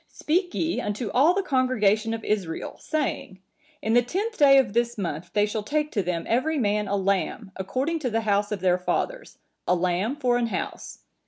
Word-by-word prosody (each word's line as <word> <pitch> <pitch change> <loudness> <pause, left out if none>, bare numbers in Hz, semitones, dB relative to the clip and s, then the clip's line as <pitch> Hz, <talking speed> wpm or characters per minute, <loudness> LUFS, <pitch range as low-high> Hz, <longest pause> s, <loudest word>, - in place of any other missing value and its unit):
Speak 355 +3 -1
ye 330 +1 0
unto 210 +1 -3
all 305 +8 +4
the 395 - 0
congregation 225 - +2
of 225 - -8
Israel, 190 -6 -2
saying, 285 -10 -3 0.4
In 220 - +1
the 245 - +6
tenth 400 - -3
day 275 -5 +6
of 255 -7 +3
this 235 0 0
month 170 -3 -4
they 205 0 +3
shall 210 +1 -3
take 300 +7 -1
to 205 - 0
them 175 -2 -2
every 280 +7 +1
man 210 -4 0
a 200 - 0
lamb, 195 +1 -1
according 260 - -2
to 265 -5 -2
the 225 0 0
house 205 -1 +1
of 205 -3 -3
their 180 -1 +2
fathers, - - -3 0.3
a 180 - +4
lamb 185 +7 0
for 250 -4 +1
an 240 -1 0
house. - - -5
225 Hz, 195 wpm, -25 LUFS, 200-280 Hz, 0.4 s, the